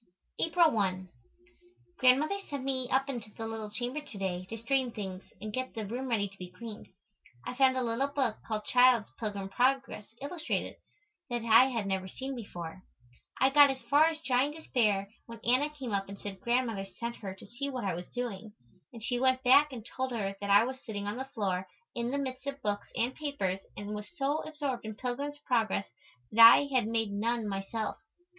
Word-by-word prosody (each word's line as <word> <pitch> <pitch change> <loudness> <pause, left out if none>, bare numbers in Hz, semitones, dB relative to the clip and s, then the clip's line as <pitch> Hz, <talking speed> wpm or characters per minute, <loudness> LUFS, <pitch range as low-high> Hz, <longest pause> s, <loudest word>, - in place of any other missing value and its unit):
April 330 -1 +4
1. 185 -3 0 0.9
Grandmother 280 +9 +4
sent 280 -2 -4
me 260 -2 -2
up 270 +1 +2
into 240 -6 -5
the 225 - -4
little 225 -1 -5
chamber 245 +7 -3
to 285 -8 -10
day 185 -2 -2
to 225 - -5
straighten 250 +2 0
things 190 -4 -5 0.2
and 215 0 -6
get 255 +1 -3
the 220 -2 -3
room 245 +6 -4
ready 210 -4 +1
to 195 0 -17
be 180 -1 -7
cleaned. 215 +3 -9 0.6
I - - -3
found 260 0 +4
a 255 - +1
little 235 +4 +1
book 270 -6 0
called 215 -1 -3
"Child's 250 -3 +5
Pilgrim 205 -3 -3
Progress, 260 -1 +1
Illustrated," 315 +4 -3 0.5
that 240 -1 -2
I 230 +3 +8
had 235 -6 -1
never 190 -1 -1
seen 265 +7 -5
before. 180 -6 -7 0.6
I 265 +1 +5
got 290 0 +8
as 270 - -1
far 295 +2 +7
as 325 -1 +1
Giant 275 +1 +1
Despair 215 -10 +1 0.2
when 230 -1 -9
Anna 255 +5 +3
came 270 -6 -6
up 195 -1 -1
and 200 0 -8
said 195 -2 -7
Grandmother 235 -5 0
sent 235 0 -3
her 195 -3 -6
to - - -13
see 255 +7 -4
what 255 -3 -4
I 190 - 0
was 175 +1 -6
doing, 225 -4 -5 0.4
and 230 -2 -10
she 245 +1 0
went 260 0 +2
back 280 +3 +6
and 230 -4 -8
told 260 +1 -3
her 195 -4 -2
that 200 - -3
I 200 +2 +7
was 260 +2 -5
sitting 205 -3 -5
on 205 +3 -3
the 265 - -3
floor 195 -8 -2 0.3
in 235 0 -2
the 280 - -1
midst 265 -1 -4
of 280 0 -3
books 205 -1 -1
and 245 +3 +1
papers 265 -12 -2 0.2
and 205 +1 -5
was 210 0 -6
so 285 +3 +1
absorbed 285 -5 -3
in 215 -1 -6
"Pilgrim's 270 +5 -3
Progress" 225 -5 +1 0.5
that 230 +1 +7
I 285 - +5
had 245 -4 +3
made 225 -2 0
none 225 +2 -1
myself. 205 +2 -3
235 Hz, 200 wpm, -31 LUFS, 205-265 Hz, 0.9 s, I